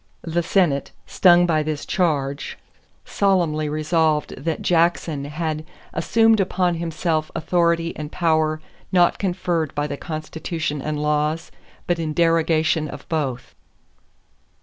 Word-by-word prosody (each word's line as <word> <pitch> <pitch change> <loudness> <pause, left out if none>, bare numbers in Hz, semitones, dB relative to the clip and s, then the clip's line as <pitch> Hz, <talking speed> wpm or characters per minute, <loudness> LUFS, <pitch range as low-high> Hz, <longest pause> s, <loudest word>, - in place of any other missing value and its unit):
The 170 +1 0
Senate, 165 -6 +1 0.2
stung 175 -1 +5
by 160 -3 +2
this 155 -1 -3
charge, 145 -6 -1 0.5
solemnly 170 -6 +1
resolved 155 0 +1
that 160 +2 -3
Jackson 165 -4 +1
had 155 +1 -3 0.3
"assumed 225 -1 +3
upon 185 -2 +1
himself 165 -1 -1
authority 170 0 +1
and 150 0 -6
power 155 -2 +1 0.3
not 175 -2 +3
conferred 175 -5 -1
by 145 0 0
the 145 -1 -4
Constitution 155 -1 -4
and 150 +1 -3
laws, 150 +2 0 0.3
but 175 -1 0
in 155 -2 -2
derogation 165 -1 +2
of - - -9
both." 135 -6 -2
160 Hz, 120 wpm, -22 LUFS, 150-170 Hz, 0.5 s, stung